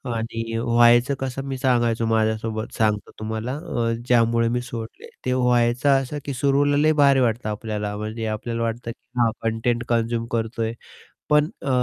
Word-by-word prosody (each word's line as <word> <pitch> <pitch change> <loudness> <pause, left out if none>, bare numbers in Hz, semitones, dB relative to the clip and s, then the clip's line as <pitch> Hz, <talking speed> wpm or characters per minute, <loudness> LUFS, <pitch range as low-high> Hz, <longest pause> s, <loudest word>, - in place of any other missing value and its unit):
आणि 115 0 -3
व्हायचं 120 +2 +4
कसं 135 0 -4
मी 135 -1 -3
सांगायचो 120 -3 +1
माझ्यासोबत 110 0 -1
सांगतो 105 -2 0
तुम्हाला 110 +4 -3
अ, 135 -8 -2 0.2
ज्यामुळे 115 -1 +3
मी 125 +1 0
सोडले. 115 -2 -8 0.2
ते 130 - +1
व्हायचं 125 +1 +2
असं, 135 +3 -5
की 140 - -3
सुरुवातीला 140 +2 +2
लय 155 +2 +4
भारी 140 -1 +5
वाटतं 115 -2 0
आपल्याला, 105 -1 -3
म्हणजे 110 +2 -4
आपल्याला 115 +2 -3
वाटतं 115 +1 -3
की 120 +2 -10
हां 115 -2 +4
कंटेंट 115 +1 0
कन्झ्युम 115 0 0
करतोय 115 0 -2 0.6
पण 150 0 +4
अ, - - -4
115 Hz, 155 wpm, -23 LUFS, 115-125 Hz, 0.6 s, भारी